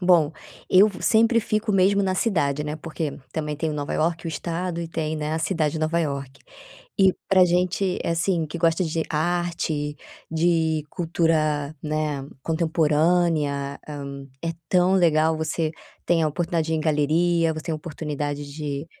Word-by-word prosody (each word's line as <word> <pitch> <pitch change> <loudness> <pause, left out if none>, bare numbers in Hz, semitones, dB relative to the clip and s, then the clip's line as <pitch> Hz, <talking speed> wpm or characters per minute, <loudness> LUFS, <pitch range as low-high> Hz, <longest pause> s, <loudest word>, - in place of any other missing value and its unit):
bom, 170 -4 +4 0.4
eu 195 +3 +7
sempre 230 +1 +4
fico 215 0 -1
mesmo 195 +1 +4
na 190 -1 +1
cidade, 150 -9 0
né? 150 0 -3
Porque, 155 -1 -4
também 150 -2 -2
tem 160 +1 -1
Nova 145 -1 -3
Iorque 165 +1 0
o - - -1
estado 170 +2 -3
e 170 - -4
tem, 160 -1 -2
né, 150 0 -2
a - - 0
cidade 160 -3 0
de 160 - -3
Nova 160 +2 +1
Iorque, 140 -3 -4 0.6
e 190 -1 +5
pra 190 -1 +6
gente, 180 +2 +1
eh, - - 0
assim, 165 0 +1
que 155 +3 -6
gosta 165 +1 +2
de 160 0 -1
arte, 160 -2 -1 0.3
de 160 -2 +1
cultura, 155 -4 0
né, 150 -3 -2 0.2
contemporânea, 160 -3 +1
hum, 140 -2 -7 0.2
é 165 - 0 0.2
tão 180 0 +3
legal 160 -3 +3
você, 160 0 -1 0.3
tem 170 -2 +2
a 155 - +3
oportunidade 165 +1 -1
de 160 - 0
ir - - +1
em - - -1
galeria, 160 +2 +2
você 155 - -6
tem 165 - -2
oportunidade 150 -2 -4
de, 145 -1 -4
160 Hz, 165 wpm, -24 LUFS, 150-175 Hz, 0.6 s, eu